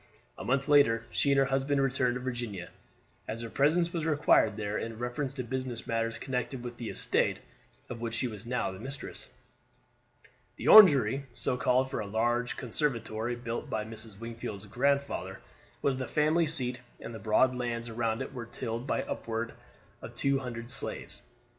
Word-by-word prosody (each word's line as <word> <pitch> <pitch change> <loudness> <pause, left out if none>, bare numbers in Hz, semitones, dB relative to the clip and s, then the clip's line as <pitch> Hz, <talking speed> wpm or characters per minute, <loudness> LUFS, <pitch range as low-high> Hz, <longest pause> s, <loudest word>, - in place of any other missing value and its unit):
A - - -8
month 135 +2 +1
later 130 -6 +5
she 140 - +2
and 140 - +4
her 135 - +5
husband 135 +1 +1
returned 130 -2 +2
to - - -2
Virginia, 120 -7 -4 0.6
as 115 +1 -4
her 115 -1 -6
presence 170 +5 +2
was 165 -3 -1
required 145 -8 +3
there 105 -1 -2
in 115 0 -3
reference 125 +3 -2
to 130 - -3
business 125 -1 -4
matters 115 0 -1
connected 125 -1 -3
with 120 -1 -6
the 115 - -5
estate, - - +1 0.5
of 115 -1 -7
which 115 -1 -3
she 125 - 0
was 105 -4 -7
now 125 -4 -1
the 95 - -9
mistress. 135 +4 -5 1.3
The - - -5
Orangery, 140 -9 +8
so - - 0
called 125 +1 +2
from - - -2
a 100 -2 -5
large 120 +2 +1
conservatory 120 -3 -1
built 120 -1 -5
by 110 -1 -2
Mrs. 110 -2 -8
Wingfield's 115 -3 -6
grandfather, 140 +6 0 0.4
was 135 -2 +1
the 130 - -3
family 155 +2 +2
seat, 125 -5 -2 0.2
and 115 - -7
the 110 - -7
broad 110 +5 +3
lands 120 -1 -2
around 115 +1 -1
it 135 - -9
were 120 -3 -6
tilled 115 +2 -4
by - - 0
upward 115 0 -3 0.5
of - - -9
two 140 0 +2
hundred 120 -2 -6
slaves. - - -3
120 Hz, 175 wpm, -30 LUFS, 115-135 Hz, 1.3 s, Orangery